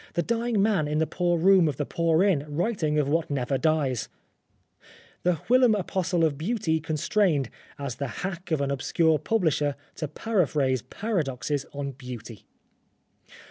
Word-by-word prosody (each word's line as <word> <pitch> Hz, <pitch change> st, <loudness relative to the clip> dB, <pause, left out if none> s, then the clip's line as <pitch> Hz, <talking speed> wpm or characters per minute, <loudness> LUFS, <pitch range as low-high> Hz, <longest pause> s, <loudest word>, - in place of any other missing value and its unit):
The 170 Hz, -, +1 dB
dying 230 Hz, 0 st, 0 dB
man 200 Hz, -8 st, +2 dB
in 150 Hz, +1 st, -1 dB
the 160 Hz, -, +2 dB
poor 175 Hz, +1 st, 0 dB
room 185 Hz, 0 st, +5 dB
of 145 Hz, -4 st, -2 dB
the 145 Hz, -, -1 dB
poor 165 Hz, +2 st, +2 dB
inn 185 Hz, -8 st, +2 dB
writing 155 Hz, -1 st, 0 dB
of 150 Hz, -2 st, +2 dB
what 160 Hz, +3 st, 0 dB
never 135 Hz, -1 st, -1 dB
dies! 150 Hz, -7 st, 0 dB, 1.1 s
The 180 Hz, 0 st, +2 dB
whilom 250 Hz, -2 st, +5 dB
apostle 180 Hz, -3 st, 0 dB
of 145 Hz, -3 st, -1 dB
Beauty 165 Hz, -3 st, 0 dB
constrained, 155 Hz, -, +1 dB, 0.3 s
as 140 Hz, -4 st, -5 dB
the 140 Hz, -, -2 dB, 0.2 s
hack 180 Hz, -2 st, -5 dB
of 160 Hz, -3 st, +1 dB
an 140 Hz, 0 st, 0 dB
obscure 155 Hz, +3 st, +2 dB
publisher, 155 Hz, -6 st, +1 dB, 0.2 s
to 155 Hz, -, -3 dB
paraphrase 150 Hz, -, 0 dB
paradoxes 145 Hz, -, -2 dB
on 140 Hz, -1 st, -4 dB
Beauty 125 Hz, -5 st, -9 dB
160 Hz, 150 wpm, -26 LUFS, 140-185 Hz, 1.1 s, room